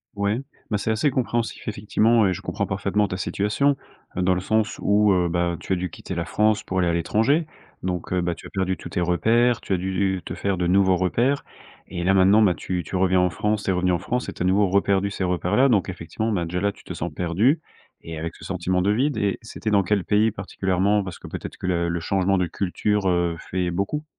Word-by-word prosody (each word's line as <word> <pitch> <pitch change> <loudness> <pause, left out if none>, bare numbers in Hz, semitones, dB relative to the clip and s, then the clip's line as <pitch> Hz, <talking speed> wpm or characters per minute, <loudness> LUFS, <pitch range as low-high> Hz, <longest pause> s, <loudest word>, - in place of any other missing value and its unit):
Ouais, 100 +4 0 0.3
bah, 105 - +2
c'est 110 - -3
assez 110 +6 +1
compréhensif 120 -3 -2
effectivement 110 +1 +2
et 95 - +1
je - - -7
comprends - - -2
parfaitement 105 0 0
ta 90 - -4
situation 105 +9 +1 0.4
dans 90 0 +2
le 90 - -1
sens 110 +2 0
où 105 0 +4
heu, 90 -1 +2
bah 85 0 0
tu - - -8
as - - +3
dû 90 -1 -3
quitter 95 - -7
la 85 0 -2
France 105 +4 +1
pour 95 - -2
aller 90 - +2
à 85 - +1
l'étranger 115 - +2 0.4
donc 90 -2 -3
heu, 90 - +1
bah 85 0 -1
tu - - -11
as - - -13
perdu 95 -1 -1
tous - - -9
tes 90 - -2
repères, 115 +7 +2
tu - - -9
as 95 - +3
dû 95 +1 0
u - - -8
te - - -6
faire 100 -1 -1
de 90 - 0
nouveaux 95 +1 +4
repères 120 +10 +1 0.4
et 90 -2 -4
là 95 +2 +3
maintenant 95 +3 +5
ben 95 -5 +4
tu 90 -1 -3
tu 95 - -6
reviens 95 0 +3
en 90 0 +3
France, 105 +3 -1
tu - - -2
es - - +3
revenue 90 0 +1
en 85 - +1
France 125 +7 -2
et - - -6
tu - - -10
as 90 - +1
à - - +3
nouveau 100 +2 +3
reperdu 100 +1 +2
ces 100 - -3
repères 90 +1 0
là. 135 +3 +5
Donc 100 -5 +2
effectivement, 90 +5 -3
ben, 90 -5 0
déjà 90 +2 -2
là, 100 +2 +1
tu - - -19
te - - -7
sens - - -4
perdue 105 - +1 0.4
et 80 -1 -7
avec 80 +1 -5
ce - - -14
sentiment 90 0 -1
de 100 +3 +2
vide 135 +7 +1
et 100 -1 0
c'était 110 -1 -5
dans 100 -2 +4
quel 100 +1 +1
pays 110 +1 +3
particulièrement? 95 +1 0
Parce 95 -3 -8
que - - -10
peut-être - - -7
que - - -5
le 85 -2 +1
le 85 0 -1
changement 95 +3 +1
de 90 - +1
culture, 100 +2 -1
heu, 85 -2 +1
fait 90 -1 -2
beaucoup? 100 - -2
95 Hz, 255 wpm, -23 LUFS, 90-105 Hz, 0.4 s, maintenant